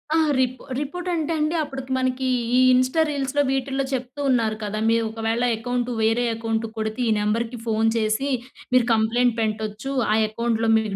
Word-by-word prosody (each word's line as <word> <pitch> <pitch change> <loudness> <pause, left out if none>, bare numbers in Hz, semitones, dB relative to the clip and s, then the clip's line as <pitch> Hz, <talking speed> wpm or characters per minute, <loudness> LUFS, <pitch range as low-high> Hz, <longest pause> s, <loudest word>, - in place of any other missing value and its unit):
ఆ! - - +4 0.2
రిప్ 255 0 0 0.2
రిపోర్ట్ 355 +6 -4
అంటే 325 -1 -1
అండి, 305 +2 0
అప్పటికి 270 -2 -7
మనకి 260 0 -1 0.3
ఈ - - +6
ఇన్స్టా 255 +5 +3
రీల్స్‌లో, 285 0 0
వీటిల్లో 270 0 -1
చెప్తూ 255 +2 -4
ఉన్నారు 230 -4 +2
కదా! 210 0 -3
"మీవు 230 0 +3
ఒకవేళ 225 +1 -1
అకౌంటు, 245 +2 -2
వేరే 225 +2 +2
అకౌంటు‌కొడితే 225 0 -3
ఈ - - +3
నెంబర్‌కి 225 +3 -1
ఫోన్ 225 0 +1
చేసి, 220 +5 0 0.4
మీరు 250 -2 +5
కంప్లెయింట్ 225 +2 +2
పెంట్టొచ్చు. 215 +3 -3 0.2
ఆ - - +4
అకౌంట్‌లో 225 0 0
మీకు 215 -3 -2
235 Hz, 160 wpm, -23 LUFS, 220-265 Hz, 0.4 s, ఈ